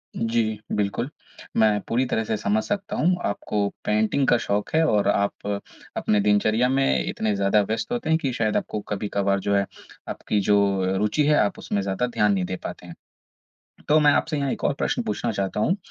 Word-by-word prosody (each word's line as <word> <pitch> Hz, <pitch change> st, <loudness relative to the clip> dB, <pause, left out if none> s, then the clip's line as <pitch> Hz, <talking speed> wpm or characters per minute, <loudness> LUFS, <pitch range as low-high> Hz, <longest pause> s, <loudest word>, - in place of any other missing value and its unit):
जी, 115 Hz, -2 st, 0 dB
बिल्कुल। 105 Hz, +6 st, -1 dB, 0.5 s
मैं 105 Hz, -2 st, +4 dB
पूरी 125 Hz, +3 st, +1 dB
तरह 110 Hz, -2 st, -1 dB
से 110 Hz, -, -1 dB
समझ 105 Hz, +2 st, 0 dB
सकता 205 Hz, -1 st, -3 dB
हूँ। 180 Hz, +3 st, +2 dB
आपको 100 Hz, 0 st, -1 dB, 0.2 s
पेंटिंग 110 Hz, +6 st, +1 dB
का 120 Hz, -, +5 dB
शौक़ 105 Hz, +5 st, -2 dB
है 160 Hz, -, +4 dB
और 105 Hz, -1 st, +2 dB
आप 100 Hz, 0 st, 0 dB, 0.5 s
अपनी 105 Hz, -, +2 dB
दिनचर्या 110 Hz, +4 st, +2 dB
में 130 Hz, -, +2 dB
इतने 110 Hz, -2 st, -1 dB
ज़्यादा 100 Hz, +1 st, +3 dB
व्यस्त 110 Hz, -, -3 dB
होते 240 Hz, -9 st, -2 dB
हैं 160 Hz, -, +4 dB
कि 135 Hz, -5 st, -1 dB
शायद 110 Hz, -3 st, 0 dB
आपको 105 Hz, -, -3 dB
कभी-कभार 100 Hz, -1 st, 0 dB
जो 100 Hz, +1 st, 0 dB
है 100 Hz, 0 st, +2 dB, 0.4 s
आपकी 105 Hz, -, -1 dB
जो 100 Hz, +1 st, +3 dB, 0.4 s
रुचि 105 Hz, +9 st, +1 dB
है 150 Hz, -, +5 dB
आप 100 Hz, -, 0 dB
उसमें 100 Hz, -, -2 dB
ज़्यादा 100 Hz, +6 st, -1 dB
ध्यान 105 Hz, -4 st, +2 dB
नहीं 95 Hz, -2 st, 0 dB
दे 95 Hz, -, -3 dB
पाते -, -, -7 dB
हैं। -, -, -10 dB, 0.9 s
तो 155 Hz, +1 st, +5 dB
मैं 150 Hz, -1 st, +6 dB
आपसे 155 Hz, 0 st, 0 dB
यहाँ 140 Hz, -1 st, -1 dB
एक -, -, -6 dB
और -, -, +3 dB
प्रश्न -, -, 0 dB
पूछना -, -, -2 dB
चाहता 100 Hz, +1 st, -2 dB
हूँ 180 Hz, -, +2 dB
105 Hz, 195 wpm, -24 LUFS, 100-125 Hz, 0.9 s, मैं